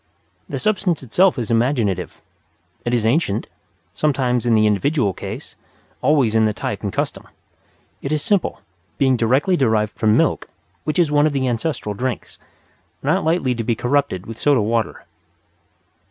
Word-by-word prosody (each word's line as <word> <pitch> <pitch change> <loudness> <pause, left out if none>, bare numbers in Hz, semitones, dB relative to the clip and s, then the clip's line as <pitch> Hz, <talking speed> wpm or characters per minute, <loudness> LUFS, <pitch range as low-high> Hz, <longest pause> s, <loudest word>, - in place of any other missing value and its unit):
The - - -3
substance 190 -7 0
itself 175 - +3
is 115 -2 -3
imaginative. 115 -6 0 0.6
It 120 - 0
is 115 -2 0
ancient 115 -4 +1 0.5
sometimes 125 -5 0
in 115 - +4
the 110 0 +4
individual 105 +1 +1
case, - - -8 0.5
always 140 -7 +3
in 110 0 +4
the 105 - -1
type - - -4
and - - -3
custom. - - -3 0.7
It 140 - -4
is 155 -1 0
simple, 205 -5 0 0.4
being 130 -2 +3
directly 130 +10 +2
derived 110 - +1
from 110 0 +2
milk, - - +1 0.4
which 155 +3 -1
is 170 -4 +3
one 145 +1 +4
of 150 - -2
the 135 -2 0
ancestral 120 -2 -2
drinks, 125 +3 -4 0.6
not - - +1
lightly 160 -5 +1
to 115 -1 -3
be 115 +1 0
corrupted 125 -6 0
with 115 0 -8
soda 145 -3 +3
water. 115 +1 -1
125 Hz, 155 wpm, -20 LUFS, 110-150 Hz, 0.7 s, in